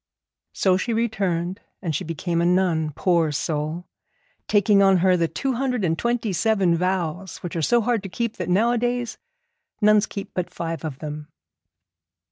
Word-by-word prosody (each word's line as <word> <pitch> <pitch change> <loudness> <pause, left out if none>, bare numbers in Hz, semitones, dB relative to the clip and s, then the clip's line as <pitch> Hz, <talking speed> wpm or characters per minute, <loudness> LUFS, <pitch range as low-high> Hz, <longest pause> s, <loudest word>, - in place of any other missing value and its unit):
So 185 -2 +2
she 230 +5 -2
returned, 195 -6 -1 0.2
and 165 -6 -3
she - - -2
became 170 +1 -2
a - - +2
nun, 175 -4 +2
poor 170 -4 +2
soul! 155 +3 -2 0.6
taking 205 -1 +4
on 195 -1 +5
her 185 +1 +4
the 170 -2 +1
two 270 - -2
hundred 250 -4 -1
and 165 -1 +1
twenty 235 0 -1
seven 195 -3 +2
vows, 180 0 -2
which 175 - -5
are 165 - -1
so 235 +9 +3
hard 230 -1 0
to 195 - -7
keep 230 +4 -3
that - - -4
nowadays 240 +4 +1 0.6
nuns 210 0 +4
keep 200 - -7
but 180 -1 -2
five 165 -2 -5
of 150 -5 -4
them. 150 0 -6
185 Hz, 165 wpm, -23 LUFS, 165-220 Hz, 0.6 s, on